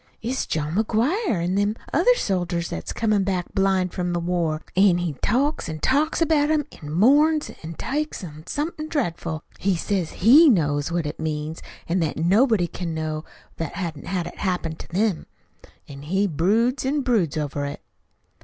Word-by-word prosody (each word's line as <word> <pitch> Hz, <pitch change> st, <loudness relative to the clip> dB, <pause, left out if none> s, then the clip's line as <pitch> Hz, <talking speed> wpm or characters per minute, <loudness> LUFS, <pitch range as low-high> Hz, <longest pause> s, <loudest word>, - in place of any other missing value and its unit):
"It's 250 Hz, +4 st, -2 dB
John 155 Hz, 0 st, -2 dB
McGuire 250 Hz, -, +1 dB
an' 180 Hz, +2 st, 0 dB
them 205 Hz, +2 st, +1 dB, 0.2 s
other -, -, +5 dB
soldiers 175 Hz, -, -1 dB
what's 80 Hz, -, -4 dB
comin' 215 Hz, -3 st, +1 dB
back 185 Hz, -2 st, -2 dB
blind 190 Hz, -2 st, +1 dB
from 175 Hz, -1 st, -2 dB
the 175 Hz, -, 0 dB
war. 170 Hz, -3 st, -1 dB
An' 190 Hz, -2 st, +5 dB
he 175 Hz, -3 st, -2 dB
talks 270 Hz, -, +1 dB
an' 160 Hz, -, -4 dB
talks 295 Hz, -, +2 dB
about 305 Hz, -2 st, +2 dB
'em, 305 Hz, -2 st, +2 dB, 0.2 s
an' 150 Hz, -, -7 dB
mourns 295 Hz, -, +4 dB
an' 160 Hz, +1 st, -7 dB
takes 300 Hz, -, -3 dB
on 155 Hz, -1 st, -10 dB
something 310 Hz, +1 st, -3 dB
dreadful. 170 Hz, -, -2 dB, 0.2 s
He 195 Hz, -1 st, +1 dB
says 180 Hz, -1 st, -1 dB
HE 285 Hz, -, +6 dB
knows 145 Hz, -, +1 dB
what 170 Hz, -2 st, -1 dB
it 150 Hz, -, -5 dB
means, 155 Hz, 0 st, -3 dB, 0.3 s
an' 175 Hz, +3 st, +1 dB
that 160 Hz, -3 st, -1 dB
nobody 200 Hz, -, +3 dB
can 170 Hz, -1 st, -5 dB
know 155 Hz, -1 st, -3 dB, 0.3 s
what 165 Hz, -2 st, -4 dB
hain't 165 Hz, -6 st, -5 dB
had 180 Hz, -2 st, -1 dB
it -, -, -9 dB
happen 180 Hz, -4 st, -1 dB
to 175 Hz, -, -9 dB
'em. 205 Hz, -4 st, 0 dB, 0.6 s
An' 140 Hz, -1 st, -10 dB
he 190 Hz, +7 st, 0 dB
broods 215 Hz, -, +1 dB
an' 280 Hz, +2 st, 0 dB
broods 205 Hz, -, +1 dB
over 145 Hz, -1 st, -2 dB
it." 140 Hz, -, -6 dB
185 Hz, 175 wpm, -23 LUFS, 160-240 Hz, 0.6 s, HE